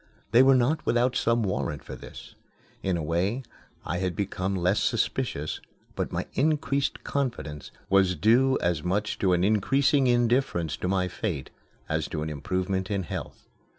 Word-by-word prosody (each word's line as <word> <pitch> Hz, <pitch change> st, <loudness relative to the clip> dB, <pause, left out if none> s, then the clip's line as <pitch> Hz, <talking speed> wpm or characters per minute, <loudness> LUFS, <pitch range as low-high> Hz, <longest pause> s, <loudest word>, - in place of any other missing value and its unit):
They 120 Hz, -, +7 dB
were 135 Hz, 0 st, +6 dB
not 130 Hz, +5 st, +2 dB
without 120 Hz, +2 st, +2 dB
some 115 Hz, 0 st, +2 dB
warrant 85 Hz, -6 st, -2 dB
for -, -, -8 dB
this. -, -, -11 dB, 0.5 s
In 95 Hz, -2 st, 0 dB
a 80 Hz, -, -3 dB
way 90 Hz, -, 0 dB, 0.4 s
I 90 Hz, -, -2 dB
had 90 Hz, -2 st, -1 dB
become 95 Hz, 0 st, -2 dB
less 90 Hz, +2 st, +2 dB
suspicious, 75 Hz, +2 st, -1 dB, 0.3 s
but -, -, -2 dB
my -, -, -2 dB
increased 140 Hz, -1 st, 0 dB
confidence 120 Hz, -, -3 dB, 0.2 s
was 95 Hz, -2 st, +3 dB
due 125 Hz, -, +4 dB
as 85 Hz, -3 st, +1 dB
much 100 Hz, +5 st, -1 dB
to 95 Hz, -2 st, +3 dB
an 90 Hz, 0 st, +2 dB
increasing 135 Hz, +7 st, +3 dB
indifference 120 Hz, -, +1 dB
to -, -, -3 dB
my 95 Hz, -1 st, +1 dB
fate 90 Hz, -6 st, -4 dB, 0.4 s
as -, -, -1 dB
to 75 Hz, -, -3 dB
an 80 Hz, -, -4 dB
improvement 95 Hz, +4 st, -2 dB
in 100 Hz, -2 st, -1 dB
health. 85 Hz, -, -7 dB
95 Hz, 160 wpm, -27 LUFS, 90-125 Hz, 0.5 s, They